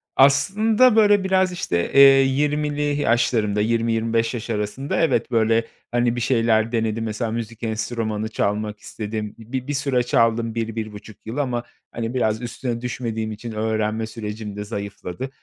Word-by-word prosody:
aslında, 215 - +4
böyle, 205 -2 +5
biraz, 190 -1 +2
işte, 85 - -2
eee, 140 - +5 0.2
20'li 145 +2 0 0.2
yaşlarımda, 110 -4 +2
20-25 115 0 +1
yaş 120 -1 -5
arasında, 105 +6 -2
evet, 165 -5 +1
böyle, 115 0 +2 0.3
hani, 120 0 +1
bir 120 - -3
şeyler 115 -2 +2
denedim. 115 -1 -1
Mesela 110 +1 -3
müzik 115 0 -5
enstrümanı 110 -1 -2
çalmak 105 0 -2
istedim. 105 -1 -5
Bi 125 +3 -5
bir 145 - -2
süre 135 -3 +1
çaldım 115 -1 +1
1-1,5 110 -2 -5
yıl 115 +5 -6
ama, 125 -4 -1 0.3
hani, 115 0 -4
biraz 110 -3 0
üstüne 120 0 -4
düşmediğim 115 -3 -3
için 110 +2 -7
öğrenme 110 0 -1
sürecim 105 -2 -6
de 105 - -4
zayıfladı, 100 +2 -6
115 Hz, 145 wpm, -22 LUFS, 110-125 Hz, 0.3 s, böyle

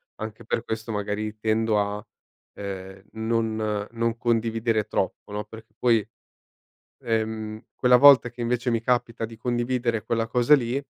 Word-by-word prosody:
anche 110 +1 -7
per 115 - -1
questo, 110 0 -4
magari, 105 +1 -3
tendo 110 0 +1
a, 105 +2 -4 0.5
ehm, 95 -1 -7
non 110 -2 -1
non 115 0 -1
condividere 115 -2 0
troppo, 100 0 -3
no, 105 +1 -2
perché 110 0 -13
poi, 115 -4 +3 1.0
ehm, 110 -1 -2
quella 125 -1 +5
volta 130 -3 +7
che, 120 - -12
invece, 120 +1 0
mi 115 - +1
capita 120 -2 0
di 115 0 -7
condividere 120 -1 -1
quella 115 0 0
cosa 125 +5 +5
lì 130 +2 -2
115 Hz, 140 wpm, -25 LUFS, 110-120 Hz, 1.0 s, volta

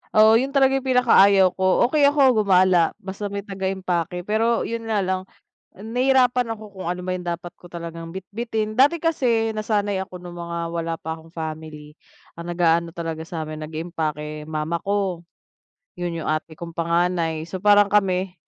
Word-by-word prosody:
Oo 220 +1 +7
yun 270 +2 -2
talaga 270 0 +4
yung 265 - -9
pinaka-ayaw 200 -7 +5
ko, 185 0 +3
okey 295 -2 +5
ako 270 -6 +4
gumala, 185 -3 +4
basta 195 +1 -5
may 200 0 -5
taga-impake 190 -3 -3
pero 225 +4 +1
yun 230 0 -4
nga 210 -3 +1
lang, 185 0 -2 0.5
nahihirapan 250 +2 +2
ako 210 -2 -12
kung 190 -3 -7
ano 180 0 -3
ba 185 - -1
yung 180 - -5
dapat 170 0 -4
ko 175 - -16
talagang 165 -1 -7
bitbitin, 215 +4 -4
dati 280 +8 +4
kasi 240 -9 +1
nasanay 205 -2 -1
ako 185 -1 -9
nung 175 -1 -10
mga 170 0 -5 0.2
wala 165 0 -2
pa 160 0 -5
akong 160 0 -14
family, 155 -2 -7 0.4
ang 170 +1 -7
nag-aano 170 -1 +2
talaga 165 -1 -5
samin, 155 -2 -6
nag-impake 155 -1 -4
mama 160 +2 -2
ko. 195 -4 -1 0.7
Yun 175 -2 -4
yung - - -2
ate 155 0 -3
kong 170 -1 -8
panganay 170 -1 0
so 180 +3 -6
parang 205 0 +5
kami, 190 -2 +1
185 Hz, 165 wpm, -23 LUFS, 165-215 Hz, 0.7 s, Oo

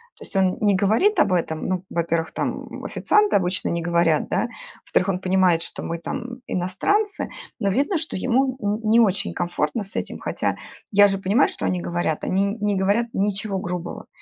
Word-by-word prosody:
То - - -13
есть - - -8
он 190 -1 +2
не 205 -2 +3
говорит 220 - +3
об 195 - +4
этом. 160 -3 -1
Ну, 185 -1 -1
во-первых, 165 -1 -1
там - - -4
официанты 420 - +2
обычно 180 0 -1
не 170 0 -1
говорят, 170 -2 +2
да. 235 - 0 0.3
Во-вторых, 185 - +1
он 190 -2 0
понимает, 185 -3 +3
что - - -6
мы 170 - -3
там 245 +8 -6
иностранцы, 405 - 0 0.3
но 200 - +1
видно, 280 - +1
что 315 -9 -4
ему 260 +4 +1
н 205 +2 -1
не 230 +2 +6
очень 205 -4 +2
комфортно 175 +6 -1
с 195 - -5
этим. - - -3
Хотя - - -2 0.3
я 205 0 +7
же 195 -1 -1
понимаю, 200 +7 +3
что - - -3
они 180 - 0
говорят. 170 -2 -2
Они 195 +2 +1
н 200 +3 -3
не 205 -1 +1
говорят 200 +5 +2
ничего 200 0 -1
грубого. 175 -1 -5
195 Hz, 190 wpm, -23 LUFS, 180-225 Hz, 0.3 s, я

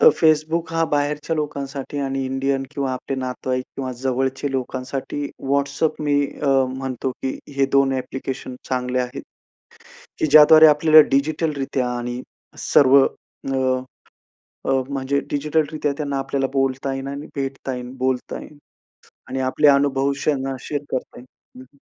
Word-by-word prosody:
तर - - +9
Facebook 160 +1 +2
हा 165 0 +3
बाहेरच्या 150 +2 0
लोकांसाठी 140 -1 -4
आणि 135 -1 -2
इंडियन 135 +1 -1
किंवा 140 -3 -2
आपले 135 +1 -4
नातेवाईक 130 0 -3
किंवा 130 -2 -3
जवळच्या 130 +1 -1
लोकांसाठी 130 +2 -4 0.3
WhatsApp 140 +2 0
मी 145 -1 +2 0.3
अ, 140 - +1 0.3
म्हणतो 130 -1 -3
की 130 - -2 0.2
हे 135 - +3
2 140 -1 +4
ॲप्लिकेशन 130 0 -5
चांगले 125 0 -1
आहेत. 125 0 -5 1.0
की 325 - +2
ज्याद्वारे 155 - +8
आपल्याला 155 +1 +7
डिजिटल 155 +3 +1
रित्या 135 -2 -1
आणि 120 +1 -4 0.4
सर्व 135 -1 +5 0.5
अ, - - -2 1.1
अ, - - +1 0.2
म्हणजे 140 0 -1
डिजिटल 150 +2 +1
रीत्या 150 -2 -1
त्यांना 140 -2 -2
आपल्याला 135 0 -1
बोलता 135 0 0
येईन 135 0 -5
आणि 140 +2 -6
भेटता 135 -1 -3
येईन, 125 0 -7
बोलता 130 -1 -2
येईल. 150 - -13 0.7
आणि 135 - -3
आपले 130 +3 +2
अनुभव 140 -1 +3
त्यांना 135 -2 0
शेअर 145 +2 -4
करता 130 - -4
येईल. 125 - -13 0.3
हं, 130 - -10
हं. - - -25
135 Hz, 145 wpm, -22 LUFS, 130-145 Hz, 1.1 s, तर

